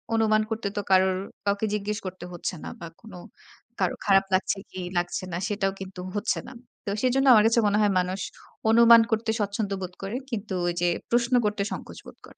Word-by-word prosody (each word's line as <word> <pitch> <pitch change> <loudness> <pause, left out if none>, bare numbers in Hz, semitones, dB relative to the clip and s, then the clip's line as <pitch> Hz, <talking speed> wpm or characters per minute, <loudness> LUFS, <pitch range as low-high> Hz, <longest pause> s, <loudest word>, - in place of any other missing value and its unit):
অনুমান 215 -1 +3
করতে 225 -2 -2
তো 205 - +1
কারো 190 0 +6 0.4
কাউকে 200 +2 +1
জিজ্ঞেস 210 0 -2
করতে 185 -1 -6
হচ্ছে 175 +1 -4
না - - -5
বা 170 - -7
কোনো 210 -5 -11 0.6
কারো - - +1
খারাপ 195 -1 +4
লাগছে 190 +1 +1
কি 185 - -7 0.2
লাগছে 175 +1 -1
না 170 - -1
সেটাও 200 -2 0
কিন্তু 185 -1 -8
হচ্ছে 205 - 0
না। - - -9 0.3
তো - - -3
সেজন্য 260 +2 +2
আমার 215 -2 +6
কাছে 230 +1 +3
মনে 205 - +2
হয় 205 - +3
মানুষ 185 +2 -2 0.5
অনুমান 230 0 +8
করতে 220 +1 0
স্বচ্ছন্দ 205 0 -2
বোধ 180 -1 -5
করে। 200 +5 -4
কিন্তু 210 -5 -4
ওইযে 175 0 0 0.2
প্রশ্ন 240 +1 +1
করতে 210 -1 0
সংকোচ - - -7
বোধ - - -12
করে। - - -18
205 Hz, 195 wpm, -26 LUFS, 185-220 Hz, 0.6 s, অনুমান